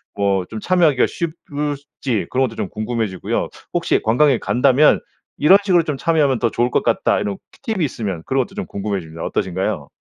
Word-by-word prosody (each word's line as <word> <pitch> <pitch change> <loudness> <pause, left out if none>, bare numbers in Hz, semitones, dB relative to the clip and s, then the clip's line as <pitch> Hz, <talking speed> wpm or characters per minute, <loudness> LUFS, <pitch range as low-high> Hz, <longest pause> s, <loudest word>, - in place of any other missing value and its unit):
뭐 100 -2 +1
좀 110 - -5
참여하기가 165 -8 +3
쉽 170 -2 -3 0.2
을지 145 -5 -3
그런 130 +1 +1
것도 115 - -10
좀 95 - -3
궁금해지고요. 110 -3 -2 0.2
혹시 - - +1
관광객이 130 +3 +3
간다면 135 +4 +4 0.4
이런 175 +7 +7
식으로 180 -4 +3
좀 150 -3 -3
참여하면 145 -5 +2
더 115 - +2
좋을 120 +2 0
것 - - +2
같다 - - +2
이런 100 -2 -3
티 230 -5 -5
팁이 185 - -1
있으면 100 - -4
그런 135 0 +1
것도 195 - -17
좀 205 -2 -3
궁금해집니다. 95 -6 -4
어떠신가요? 95 -1 -2
125 Hz, 420 characters per minute, -20 LUFS, 100-150 Hz, 0.4 s, 이런